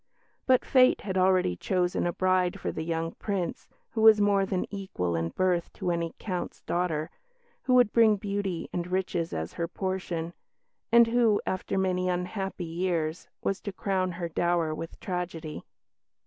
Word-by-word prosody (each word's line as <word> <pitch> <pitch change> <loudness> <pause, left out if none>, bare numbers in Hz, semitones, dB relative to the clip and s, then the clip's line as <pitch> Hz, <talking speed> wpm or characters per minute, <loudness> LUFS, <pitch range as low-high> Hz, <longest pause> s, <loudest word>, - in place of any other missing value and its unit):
But 255 -1 +4
fate 255 -1 +5
had 190 -2 -4
already 185 - +3
chosen 180 - 0
a - - +1
bride 185 +1 +1
for - - -2
the - - -5
young 165 0 -2
Prince, 195 -4 -3 0.2
who 220 - -2
was 220 -1 +8
more 200 -1 +3
than 185 -2 -1
equal 140 - -2
in 80 0 -1
birth 180 - 0
to 185 -3 -2
any 170 -1 -2
Count's 185 -4 -5
daughter; 165 -3 -1 0.5
who 255 - +2
would 245 -4 +5
bring 225 -2 +6
beauty 200 -3 -3
and 175 0 -2
riches 180 -2 -1
as 80 +1 -4
her 170 - -2
portion; 175 -2 -3 0.6
and 235 0 +8
who, 230 -2 +3
after 185 +1 -2
many 185 -1 +1
unhappy 180 +1 -3
years, 165 -1 -2 0.2
was 195 - -1
to 200 - -4
crown 185 -1 -1
her 170 0 -3
dower 170 -1 0
with 165 +1 -7
tragedy. 170 -4 -4
185 Hz, 160 wpm, -28 LUFS, 170-195 Hz, 0.6 s, was